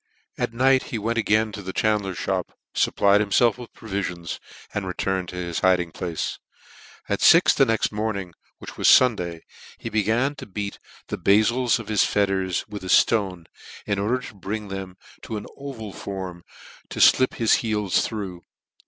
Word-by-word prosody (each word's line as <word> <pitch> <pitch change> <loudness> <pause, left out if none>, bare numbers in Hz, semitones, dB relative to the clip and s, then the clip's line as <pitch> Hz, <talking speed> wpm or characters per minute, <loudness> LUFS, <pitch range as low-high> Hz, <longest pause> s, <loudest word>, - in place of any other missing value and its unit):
At - - -2
night 130 +2 +3
he 115 - -4
went 115 +2 -1
again 110 0 +2
to 100 - -7
the 95 -1 -5
chandler's 105 -4 0
Ihop, - - -1 0.3
fupplied 100 +1 +3
himfelf 110 +3 +2
with 120 - -10
provilions, 90 -6 -5 0.3
and 100 -2 -3
returned 95 0 -2
to - - -8
his 85 -2 -3
hiding 90 -2 +2
place. 85 0 -4 0.7
At - - -1
fix - - +7
the - - +3
next 115 -1 +1
morning, 105 -4 -3 0.2
which - - -10
was - - +2
Sunday, 90 -10 +4 0.4
he - - -6
began 110 +6 +1
to - - -9
beat 100 0 -5 0.3
the - - -4
bafils 115 +4 +3
of 115 -3 -8
his 105 -2 +3
fetters 95 -3 0
with 105 -2 -8
a - - -6
irone, 95 -3 +2 0.4
in 100 -1 -1
order 110 +6 +1
to 125 -3 -9
bring 105 +1 -5
them 95 -1 -6 0.2
to 110 - -5
an 105 - -7
oval 120 -8 -7
form, 95 -3 -7 0.4
to - - -6
flip 130 - +5
his 115 -2 +3
heels 105 -4 0
through. 95 -6 -5
100 Hz, 170 wpm, -24 LUFS, 95-110 Hz, 0.7 s, fix